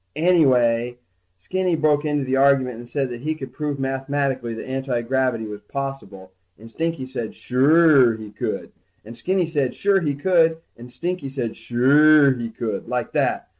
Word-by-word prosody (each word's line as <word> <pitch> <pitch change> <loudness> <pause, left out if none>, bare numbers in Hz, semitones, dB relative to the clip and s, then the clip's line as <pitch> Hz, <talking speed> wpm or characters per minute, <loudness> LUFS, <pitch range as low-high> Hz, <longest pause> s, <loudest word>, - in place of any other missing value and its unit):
Anyway, 125 -8 +2 0.4
Skinny 185 - -1
broke 155 -1 +1
into 145 -2 0
the 130 +1 0
argument 135 -3 +2
and 120 0 -11
said 135 0 -2
that 120 -1 -7
he 155 +3 -2
could 135 -5 -9
prove 145 0 -4
mathematically 135 -2 -2
that 110 - -8
antigravity 130 -2 -1
was 105 -1 -8
possible, 105 -8 -7 0.3
and 115 +2 -14
Stinky 165 -1 -3
said 125 -4 -6
suure 135 -2 +4
he 110 -1 -10
could, - - -4 0.3
and 115 +2 -10
Skinny 185 +6 0
said 145 -6 -2
sure 200 -1 +2
he 145 -4 -1
could, 165 +1 +2 0.2
and 120 +1 -13
Stinky 170 +2 -4
said 130 -4 -3
suuure 140 +5 +4
he 120 -2 -5
could, 115 0 -5
like - - -3
that. - - -1
135 Hz, 165 wpm, -22 LUFS, 120-155 Hz, 0.4 s, suure